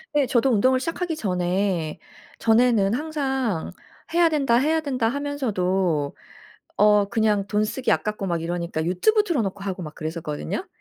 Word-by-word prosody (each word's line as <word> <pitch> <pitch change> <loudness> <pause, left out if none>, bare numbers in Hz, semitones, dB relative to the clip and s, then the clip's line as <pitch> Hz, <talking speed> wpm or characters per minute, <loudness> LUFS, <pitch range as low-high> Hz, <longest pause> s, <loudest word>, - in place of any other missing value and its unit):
네 290 -2 +4
저도 250 +1 +2
운동을 255 +3 +3
시작하기 330 +4 -3
전에 180 - -1 0.4
전에는 225 -3 +3
항상 265 - -2 0.4
'해야 340 0 +5
된다. 275 -6 +2
해야 315 +5 +2
된다.' 260 -6 -1
하면서도 195 - -1 0.6
어 210 0 +5
그냥 215 -3 +1
돈 210 +1 0
쓰기 250 +4 -1
아깝고 210 -2 -1
막 170 -3 -1
이러니까 170 -1 -3
유튜브 190 - +2
틀어놓고 220 - -2
하고 190 -2 -4
막 155 -1 -8
그랬었거든요. 155 - -4
215 Hz, 330 characters per minute, -24 LUFS, 180-270 Hz, 0.6 s, 해야